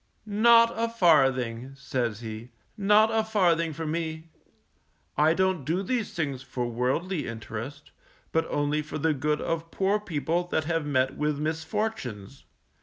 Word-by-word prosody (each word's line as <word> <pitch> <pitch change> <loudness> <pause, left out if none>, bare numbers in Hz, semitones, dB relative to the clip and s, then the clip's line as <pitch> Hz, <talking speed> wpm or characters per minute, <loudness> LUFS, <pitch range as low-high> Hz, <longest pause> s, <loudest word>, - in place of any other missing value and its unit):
Not 230 +2 +5
a 230 +1 0
farthing_, 135 - +2
says 120 -5 -2
he, 110 +1 -7 0.3
_not 210 +2 +5
a 225 0 +2
farthing 175 -7 +2
for 160 +2 -5
me. 160 0 -3 0.9
I 155 +3 +4
don't 190 -4 +1
do 170 +8 -1
these 235 +2 -1
things 140 -6 -2
for 130 -2 -4
worldly 130 +9 -1
interest, 115 +5 -7 0.4
but 160 0 +1
only 145 +1 0
for 150 - -6
the 155 +1 +1
good 150 +2 0
of 165 0 -3
poor 195 +4 +1
people 170 -2 -2
that 160 -2 0
have 165 -1 -1
met 130 -2 +1
with 150 -1 0
misfortunes. 155 - -4
155 Hz, 145 wpm, -27 LUFS, 135-185 Hz, 0.9 s, Not